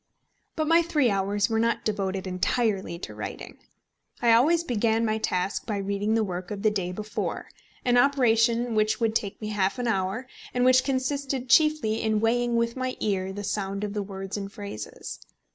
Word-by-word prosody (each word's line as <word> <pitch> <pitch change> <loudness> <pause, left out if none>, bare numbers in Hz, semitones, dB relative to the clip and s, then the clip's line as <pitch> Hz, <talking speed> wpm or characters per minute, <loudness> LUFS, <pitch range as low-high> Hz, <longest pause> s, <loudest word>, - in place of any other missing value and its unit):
But 310 -1 -1
my 330 +2 +5
three 300 -8 +2
hours 200 +1 +1
were 225 -1 0
not 230 +1 0
devoted 195 -3 -1
entirely 190 0 0
to 170 - -7
writing. - - -7 0.6
I 235 -1 +4
always 320 +9 +4
began 230 -4 +1
my 220 0 0
task 185 -1 -1
by 210 -3 -1
reading 200 +2 -1
the 225 - +2
work 180 -2 -4
of 205 -1 -5
the 215 - +4
day 185 -4 -2
before, 215 +3 -4 0.4
an 245 -1 +4
operation 240 -3 +3
which 215 0 +2
would 225 -2 +1
take 205 -2 -2
me 215 - -5
half 200 +1 0
an 245 -1 -2
hour, 195 +3 -1 0.3
and 250 0 +3
which 255 0 +6
consisted 265 -1 -2
chiefly 305 -8 +4
in 220 -1 +1
weighing 240 +2 +1
with 235 0 +1
my 255 -1 -3
ear 190 -2 -1
the 205 +1 -6
sound 200 0 -2
of 205 -1 -3
the 210 - -1
words 195 0 -5
and 200 -1 -5
phrases. 200 - -7
220 Hz, 185 wpm, -26 LUFS, 200-245 Hz, 0.6 s, which